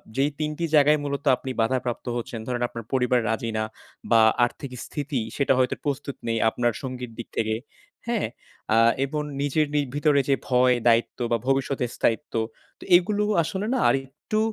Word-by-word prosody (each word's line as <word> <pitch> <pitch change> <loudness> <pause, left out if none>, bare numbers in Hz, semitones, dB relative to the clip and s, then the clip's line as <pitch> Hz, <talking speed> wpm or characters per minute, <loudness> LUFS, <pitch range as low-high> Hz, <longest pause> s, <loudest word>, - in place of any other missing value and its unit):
যেই 140 +2 +2
৩ 155 -1 -1
টি 170 - -1
জায়গায় 150 +1 +5
মূলত 140 0 -3
আপনি 130 - -5
বাধাপ্রাপ্ত 125 +1 -1
হচ্ছেন, 115 -1 -5
ধরেন 125 -1 -2
আপনার 115 -2 -8
পরিবার 125 -1 +3
রাজি 115 +1 -1
না, 110 - +1 0.5
বা 115 -1 +7 0.2
আর্থিক 130 +2 -7
স্থিতি 145 -3 -3 0.2
সেটা 140 -1 +3
হয়তো 130 - +2
প্রস্তুত 140 -1 -2
নেই 115 0 0
আপনার 120 +1 0
সঙ্গীর 125 -2 -5
দিক 120 - -6
থেকে, 110 0 0 0.5
হ্যাঁ? 235 - 0 0.5
আ - - +4 0.3
এবং 150 +2 -3 0.2
নিজের 145 +2 +1
নি 150 - +3 0.2
ভিতরে 145 -1 +3
যে 135 - +5
ভয়, 125 0 +4
দায়িত্ব 115 +2 +2
বা 115 - +3
ভবিষ্যতের 135 -2 0
স্থায়িত্ব, 120 +6 0 0.5
তো - - -11
এইগুলো 205 +4 +3 0.2
আসলে 190 +5 -3
না 260 - +1
আরেকটু 135 +10 -2
135 Hz, 170 wpm, -25 LUFS, 120-150 Hz, 0.5 s, বা